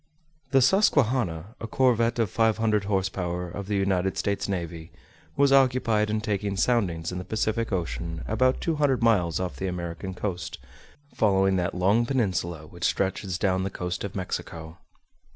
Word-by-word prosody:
The 135 Hz, -2 st, +4 dB
Susquehanna, 120 Hz, -, +2 dB
a 115 Hz, -, -5 dB
corvette 120 Hz, -1 st, +2 dB
of 115 Hz, -5 st, 0 dB
500 110 Hz, -2 st, +2 dB
horse 95 Hz, -2 st, +1 dB
power, 90 Hz, -1 st, -3 dB
of 100 Hz, +2 st, -6 dB
the 105 Hz, -, -1 dB
United 95 Hz, -1 st, 0 dB
States 100 Hz, 0 st, -1 dB
navy, 85 Hz, -3 st, -4 dB, 0.4 s
was 140 Hz, -1 st, +4 dB
occupied 125 Hz, -5 st, +3 dB
in 110 Hz, 0 st, 0 dB
taking 100 Hz, -2 st, -2 dB
soundings 90 Hz, -9 st, +1 dB
in 90 Hz, -, -4 dB
the -, -, -5 dB
Pacific 110 Hz, +3 st, -1 dB
Ocean 80 Hz, -, -3 dB
about 130 Hz, +4 st, +2 dB
200 145 Hz, -6 st, +1 dB
miles 95 Hz, -8 st, +3 dB
off 90 Hz, -2 st, -3 dB
the 95 Hz, -, -3 dB
American 90 Hz, +1 st, -5 dB
coast, 90 Hz, -3 st, -4 dB, 0.6 s
following 95 Hz, -2 st, +3 dB
that 90 Hz, +1 st, -1 dB
long 100 Hz, +6 st, +2 dB
peninsula 90 Hz, -, -1 dB
which 85 Hz, +2 st, -11 dB
stretches 95 Hz, -1 st, -1 dB
down 95 Hz, -2 st, +1 dB
the 95 Hz, -, -1 dB
coast 90 Hz, -1 st, -4 dB
of 100 Hz, -, -5 dB
Mexico. 85 Hz, -3 st, -5 dB
100 Hz, 155 wpm, -26 LUFS, 90-115 Hz, 0.6 s, The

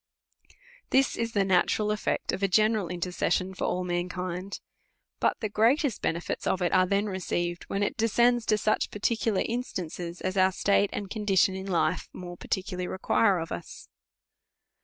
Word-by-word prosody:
This 265 Hz, 0 st, +3 dB
is 230 Hz, 0 st, -2 dB
the 200 Hz, -2 st, +2 dB
natural 190 Hz, +3 st, +2 dB
eft'ect 210 Hz, 0 st, -1 dB
of 185 Hz, -, -4 dB
a 195 Hz, -, +3 dB
general 215 Hz, 0 st, +2 dB
intercession 180 Hz, +2 st, -1 dB
for -, -, -3 dB
all 180 Hz, -, -1 dB
mankind. 180 Hz, +1 st, -3 dB, 0.6 s
But -, -, +1 dB
the 215 Hz, -, 0 dB
greatest 235 Hz, -, +2 dB
benefits 170 Hz, +1 st, -2 dB
of 185 Hz, -, +1 dB
it 175 Hz, -, 0 dB
are 185 Hz, 0 st, +4 dB
then 200 Hz, +2 st, +1 dB
received, 175 Hz, -3 st, -2 dB
when 200 Hz, +1 st, -1 dB
it -, -, -2 dB
de 225 Hz, -, +2 dB
scends 240 Hz, +1 st, +3 dB
to 215 Hz, -, +3 dB
such 215 Hz, 0 st, +1 dB
particular 215 Hz, 0 st, 0 dB
instances 180 Hz, -7 st, -4 dB
as 185 Hz, +1 st, -3 dB
our 190 Hz, 0 st, +4 dB
state 200 Hz, +1 st, +2 dB
and 200 Hz, -, -4 dB
condition 200 Hz, -3 st, +2 dB
in 190 Hz, +1 st, -6 dB
life 175 Hz, -4 st, 0 dB
more 175 Hz, -1 st, -8 dB
particularly 180 Hz, 0 st, -3 dB
require 195 Hz, +1 st, +2 dB
of 165 Hz, -1 st, -5 dB
us. 85 Hz, -, -8 dB
190 Hz, 165 wpm, -28 LUFS, 180-215 Hz, 0.6 s, are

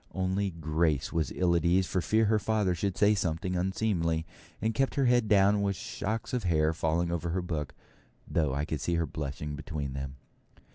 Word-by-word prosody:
Only 95 Hz, +1 st, 0 dB
Grace 80 Hz, -3 st, 0 dB
was 80 Hz, -3 st, 0 dB
ill 90 Hz, -2 st, +2 dB
at 85 Hz, -, +1 dB
ease 90 Hz, +2 st, +3 dB
for 90 Hz, +1 st, -1 dB
fear 110 Hz, +5 st, +2 dB
her 110 Hz, 0 st, +3 dB
father 105 Hz, -3 st, +1 dB
should 95 Hz, +2 st, -2 dB
say 105 Hz, +1 st, +5 dB
something 90 Hz, -1 st, -1 dB
unseemly, 90 Hz, -3 st, 0 dB, 0.3 s
and 110 Hz, +1 st, 0 dB
kept 135 Hz, +4 st, 0 dB
her 140 Hz, -, +2 dB
head 120 Hz, -2 st, +3 dB
down 100 Hz, 0 st, +4 dB
with 100 Hz, -1 st, 0 dB
shocks 110 Hz, +5 st, -4 dB
of 125 Hz, -, 0 dB
hair 80 Hz, -2 st, +2 dB
falling 80 Hz, +1 st, 0 dB
over 85 Hz, 0 st, -2 dB
her 90 Hz, +2 st, -1 dB
book, 80 Hz, -5 st, -4 dB, 0.5 s
though 75 Hz, -4 st, +1 dB
I 70 Hz, +2 st, -1 dB
could 75 Hz, -3 st, -3 dB
see 85 Hz, -, 0 dB
her 85 Hz, 0 st, +1 dB
blushing 75 Hz, 0 st, -5 dB
between 75 Hz, -2 st, -4 dB
them. 70 Hz, 0 st, -5 dB
85 Hz, 195 wpm, -29 LUFS, 80-100 Hz, 0.5 s, say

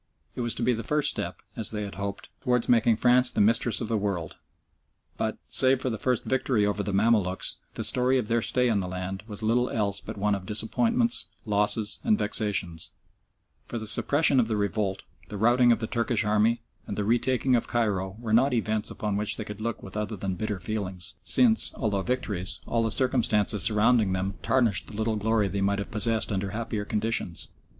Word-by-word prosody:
It -, -, -5 dB
was 120 Hz, -1 st, 0 dB
to 120 Hz, -, -3 dB
be 125 Hz, +1 st, +3 dB
the 115 Hz, 0 st, -4 dB
first 150 Hz, +5 st, +1 dB
step, -, -, -5 dB
as 110 Hz, -, -4 dB
they 105 Hz, -1 st, -4 dB
had 100 Hz, -, -6 dB
hoped, 100 Hz, +1 st, -6 dB
towards 125 Hz, -3 st, +1 dB
making 115 Hz, -2 st, +3 dB
France 125 Hz, +1 st, +4 dB
the -, -, -3 dB
Mistress 115 Hz, +1 st, +3 dB
of 115 Hz, -, -2 dB
the 110 Hz, -1 st, 0 dB
World, 95 Hz, -6 st, -3 dB, 0.8 s
but, -, -, -2 dB
save 130 Hz, 0 st, +3 dB
for 130 Hz, -1 st, -2 dB
the 110 Hz, -, -3 dB
first 125 Hz, +1 st, 0 dB
victory 130 Hz, -5 st, +1 dB
over 105 Hz, 0 st, 0 dB
the 100 Hz, -, -3 dB
Mamaluks, 100 Hz, -2 st, +1 dB, 0.2 s
the -, -, -3 dB
story 130 Hz, +1 st, +2 dB
of 120 Hz, -4 st, -2 dB
their 115 Hz, +1 st, +1 dB
stay 125 Hz, +2 st, +1 dB
in 110 Hz, -4 st, +1 dB
the 90 Hz, -, -3 dB
land 95 Hz, +1 st, -5 dB
was 105 Hz, -1 st, -6 dB
little 120 Hz, +3 st, +2 dB
else 100 Hz, -3 st, -1 dB
but -, -, -8 dB
one 105 Hz, +1 st, +1 dB
of 95 Hz, -2 st, -4 dB
disappointments, 230 Hz, -, +1 dB, 0.2 s
losses 105 Hz, 0 st, +2 dB
and 220 Hz, -2 st, +3 dB
vexations; 100 Hz, -, +1 dB, 0.8 s
for 120 Hz, -, -5 dB
the 110 Hz, -, -5 dB
suppression 140 Hz, +6 st, +3 dB
of 115 Hz, -, +2 dB
the 110 Hz, -2 st, -1 dB
revolt, 100 Hz, -1 st, -1 dB, 0.3 s
the 105 Hz, -, -6 dB
routing 120 Hz, +3 st, +4 dB
of 115 Hz, -1 st, +1 dB
the -, -, -1 dB
Turkish 115 Hz, -2 st, -1 dB
Army, 110 Hz, +2 st, +2 dB, 0.2 s
and 100 Hz, -, -5 dB
the 105 Hz, -, 0 dB
retaking 125 Hz, +3 st, +2 dB
of 120 Hz, -, 0 dB
Cairo 100 Hz, -5 st, -1 dB
were 115 Hz, -2 st, -3 dB
not 125 Hz, +3 st, +4 dB
events 110 Hz, -2 st, -1 dB
upon 105 Hz, -2 st, -3 dB
which 105 Hz, 0 st, -1 dB
they 110 Hz, -, -5 dB
could 105 Hz, 0 st, -8 dB
look 115 Hz, +1 st, -4 dB
with 95 Hz, -, -9 dB
other 105 Hz, +1 st, -3 dB
than 95 Hz, -1 st, -3 dB
bitter 105 Hz, +2 st, -3 dB
feelings, 95 Hz, -1 st, -4 dB
since, 230 Hz, -3 st, +3 dB
although 105 Hz, -6 st, -1 dB
victories, 100 Hz, -6 st, -2 dB
all 115 Hz, -, 0 dB
the 115 Hz, -, 0 dB
circumstances 110 Hz, -5 st, +1 dB
surrounding 110 Hz, -1 st, +3 dB
them 95 Hz, +1 st, -2 dB
tarnished 120 Hz, -7 st, +1 dB
the -, -, -11 dB
little 110 Hz, +1 st, -1 dB
glory 105 Hz, 0 st, +1 dB
they 100 Hz, 0 st, -3 dB
might 100 Hz, +1 st, +1 dB
have 100 Hz, -, -5 dB
possessed 110 Hz, +1 st, 0 dB
under 100 Hz, 0 st, -2 dB
happier 110 Hz, 0 st, -4 dB
conditions. 105 Hz, -5 st, -2 dB
110 Hz, 205 wpm, -27 LUFS, 100-120 Hz, 0.8 s, France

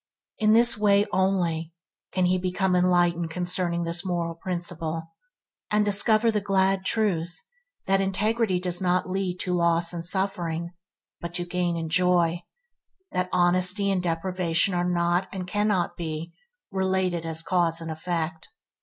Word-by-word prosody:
In 215 Hz, 0 st, +4 dB
this 235 Hz, -1 st, +5 dB
way 205 Hz, -1 st, +4 dB
only 175 Hz, -4 st, 0 dB, 0.4 s
can 185 Hz, -1 st, +1 dB
he 185 Hz, +1 st, +2 dB
become 185 Hz, +1 st, 0 dB
enlightened 175 Hz, -2 st, +2 dB
concerning 175 Hz, 0 st, -1 dB
this 170 Hz, +1 st, -2 dB
moral 170 Hz, -2 st, -2 dB
principle, 165 Hz, -2 st, -3 dB, 0.7 s
and 210 Hz, 0 st, +2 dB
discover 215 Hz, +3 st, +4 dB
the 210 Hz, -1 st, -1 dB
glad 195 Hz, -1 st, +1 dB
truth 175 Hz, -7 st, 0 dB, 0.5 s
that 195 Hz, 0 st, +2 dB
integrity 200 Hz, +1 st, 0 dB
does 180 Hz, 0 st, 0 dB
not 180 Hz, 0 st, +1 dB
lead 185 Hz, -1 st, -2 dB
to 180 Hz, -, -2 dB
loss 170 Hz, 0 st, +1 dB
and 170 Hz, -1 st, -5 dB
suffering, 170 Hz, -2 st, -1 dB, 0.5 s
but 170 Hz, 0 st, -7 dB
to 175 Hz, -, -2 dB
gain 175 Hz, -1 st, -1 dB
and 160 Hz, -1 st, -4 dB
joy; 175 Hz, -1 st, +2 dB, 0.7 s
that 180 Hz, 0 st, -1 dB
honesty 185 Hz, +3 st, +2 dB
and 190 Hz, -2 st, 0 dB
deprivation 175 Hz, +1 st, 0 dB
are 175 Hz, 0 st, 0 dB
not, 175 Hz, +1 st, +1 dB
and 185 Hz, -2 st, -5 dB
cannot 205 Hz, -1 st, 0 dB
be, 165 Hz, 0 st, -5 dB, 0.4 s
related 190 Hz, -3 st, 0 dB
as 165 Hz, 0 st, -2 dB
cause 170 Hz, -2 st, +1 dB
and 165 Hz, -1 st, -6 dB
effect. 160 Hz, 0 st, -4 dB
180 Hz, 145 wpm, -25 LUFS, 170-190 Hz, 0.7 s, this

